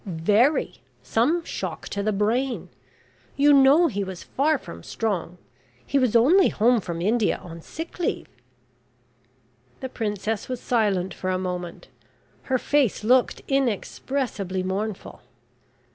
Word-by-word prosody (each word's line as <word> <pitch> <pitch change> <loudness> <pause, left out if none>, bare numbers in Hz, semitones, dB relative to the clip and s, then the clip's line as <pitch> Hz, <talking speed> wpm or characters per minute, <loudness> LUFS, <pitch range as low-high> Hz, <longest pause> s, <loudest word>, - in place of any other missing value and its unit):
"Very. 205 - +1 0.2
Some 250 - +1
shock - - -5
to 200 - -3
the 215 +1 0
brain. 230 +6 -1 0.7
You 290 +1 +5
know 280 +5 +6
he 205 -10 -1
was 190 -2 -7
far 300 +3 +1
from 85 - -10
strong. 180 - -3 0.5
He 280 - +1
was 250 -3 +1
only 320 +12 +5
home 235 +1 +3
from 170 -2 -5
India 220 +2 +2
on 170 -1 -10
sick 325 - -8
leave." 350 - -1 1.5
The 260 - -5
princess 215 -2 -3
was 255 -2 -3
silent 200 -7 0
for 185 - -4
a 185 - +1
moment. 180 -2 -5 0.6
Her 260 - +3
face 270 -5 +1
looked 250 +3 +2
inexpressibly 245 -6 -1
mournful. 195 +2 -4
220 Hz, 130 wpm, -24 LUFS, 190-265 Hz, 1.5 s, know